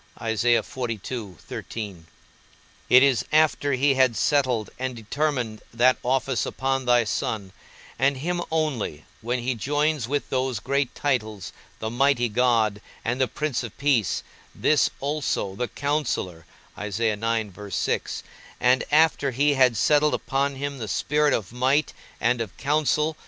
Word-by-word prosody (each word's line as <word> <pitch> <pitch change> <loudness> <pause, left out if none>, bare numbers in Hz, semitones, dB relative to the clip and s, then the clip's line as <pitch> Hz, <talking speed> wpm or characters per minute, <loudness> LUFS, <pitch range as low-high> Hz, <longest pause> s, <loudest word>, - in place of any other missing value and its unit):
_ 110 -4 -3 0.8
it 125 +1 +8
is 135 -4 +3
after 155 -2 +3
he 135 +2 +3
had 130 -3 +3
settled 130 -8 +1
and 130 -1 -3
determined 120 -1 -2
that 125 +2 +4
office 130 0 0
upon 135 0 -1
thy 120 -1 +4
Son, 105 -3 -3 0.5
and 135 +1 +2
him 175 +5 -2
only, 145 - -2 0.2
when 120 +3 -1
he 125 +1 -1
joins 145 +2 0
with 145 +2 -2
those 130 -4 0
great 140 +2 -1
titles, 110 -9 -2 0.2
the 110 0 -4
mighty 125 0 +2
God 110 -3 +2 0.2
and 125 +3 0
the 130 - +3
Prince 150 -3 -2
of 120 -4 -8
peace, 140 -8 +1 0.3
this 150 - +3
also, 140 -8 -1
the 125 +4 -2
Counsellor; 130 - -2 0.3
and 105 0 -1 1.3
after 155 -2 +4
he 145 +3 +2
had 130 -4 +4
settled 150 +5 +3
upon 140 0 -1
him 140 0 -4
the 110 - -4
spirit 150 +8 +1
of 110 -3 -2
might 130 +5 +1 0.3
and 120 0 +1
of 110 -5 -6
counsel. 150 +2 +1
130 Hz, 130 wpm, -25 LUFS, 115-140 Hz, 1.3 s, it